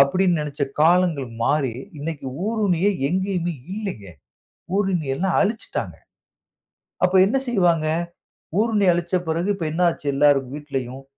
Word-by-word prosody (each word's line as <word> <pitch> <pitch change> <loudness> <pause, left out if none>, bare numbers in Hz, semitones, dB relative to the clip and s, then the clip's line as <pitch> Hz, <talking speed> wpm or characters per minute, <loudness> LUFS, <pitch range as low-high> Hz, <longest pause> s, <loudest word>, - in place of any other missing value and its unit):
அப்பிடின்னு 175 +4 +3
நினச்ச 145 -1 -4 0.2
காலங்கள் 165 -4 +3 0.2
மாறி 140 -4 +1 0.3
இன்னக்கி 150 -2 -5 0.2
ஊருணியே 205 -4 +1 0.2
எங்கேயுமே 180 0 -1 0.2
இல்லேங்க! 195 - -5 0.7
ஊருணிய 180 -9 0
எல்லாம் 185 +2 0
அழிச்சுட்டாங்க. 220 +3 -2 1.1
அப்ப 180 +1 +2
என்ன 240 +7 +1
செய்வாங்க? 175 -8 +2 0.7
ஊருணி 215 -3 +2
அழிச்ச 175 +1 -1
பிறகு 170 +5 0
இப்ப 170 - -4
என்ன 175 +3 0
ஆச்சு 165 - -7
எல்லார் 145 0 +5
வீட்லயும் 135 -3 -5
170 Hz, 120 wpm, -22 LUFS, 145-190 Hz, 1.1 s, எல்லார்